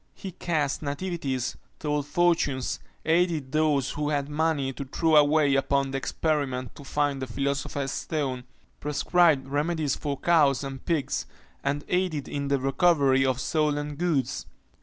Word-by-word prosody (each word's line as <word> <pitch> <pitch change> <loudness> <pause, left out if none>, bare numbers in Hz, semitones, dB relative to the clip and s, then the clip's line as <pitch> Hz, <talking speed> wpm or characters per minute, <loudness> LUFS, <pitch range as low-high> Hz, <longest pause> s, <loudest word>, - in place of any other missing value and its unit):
He 190 - -7
cast 160 -5 -1
nativities 145 -4 -2 0.2
told 150 -1 -2
fortunes 150 -5 +1 0.3
aided 160 -5 +1
those 150 -3 +2
who 150 0 -2
had 145 -1 -1
money 150 -3 0
to 140 - -5
throw 160 +4 +1
away 150 -1 +5
upon 135 0 +1
the 135 - -1
experiment, 135 -5 -1
to 145 - -12
find 145 -1 -1
the 130 - -3
philosopher's 140 +2 -2
stone 135 -6 -3 0.3
prescribed 150 -1 +2
remedies 150 +1 0
for 145 -2 -3
cows 145 -6 +3
and 135 -1 -6
pigs, 165 -6 -1 0.4
and 145 +1 -1
aided 180 -6 0
in 140 -1 -3
the 140 0 +1
recovery 135 -1 +3
of 130 -1 +1
stolen 150 -1 0
goods. 140 -6 -1
145 Hz, 140 wpm, -27 LUFS, 135-155 Hz, 0.4 s, away